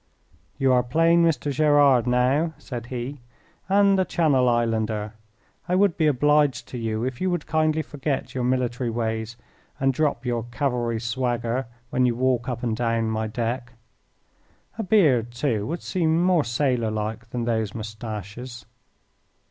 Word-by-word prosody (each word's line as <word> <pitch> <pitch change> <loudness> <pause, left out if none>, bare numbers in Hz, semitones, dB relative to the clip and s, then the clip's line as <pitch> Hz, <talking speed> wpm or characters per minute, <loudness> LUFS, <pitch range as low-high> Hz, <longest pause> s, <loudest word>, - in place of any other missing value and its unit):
"You 135 -1 +3
are 125 - +4
plain 165 +7 +3
Mr. 155 -3 +1
Gerard 145 -4 +4
now," 135 +6 +2
said 120 -5 -7
he, 125 +3 -5 0.5
"and 200 0 +4
a - - +4
Channel 145 -8 +2
Islander. 110 -2 0 0.6
I 180 - +2
would 195 -2 +3
be 160 - +2
obliged 145 -1 +2
to 125 - -6
you 110 0 -2
if 125 -1 -4
you 185 - +1
would 175 -4 -2
kindly 155 0 +1
forget 145 -1 -3
your 125 - -2
military 125 -1 0
ways 115 0 -3 0.4
and 135 0 +2
drop 140 -3 0
your 120 -2 -1
cavalry 120 -2 -1
swagger 120 +1 -2 0.2
when 125 0 +2
you 120 - 0
walk 125 0 0
up 125 0 -4
and 115 -2 0
down 115 -1 0
my 110 0 -1
deck. 120 +2 -3 1.1
A - - +2
beard, 155 - +3
too, 120 -4 -1
would 170 +4 -4
seem 165 -3 +1
more 180 -4 +3
sailor 120 -1 0
like 110 +2 -4
than 120 0 -3
those 110 -3 -1
moustaches." 110 +2 -7
125 Hz, 155 wpm, -24 LUFS, 115-150 Hz, 1.1 s, are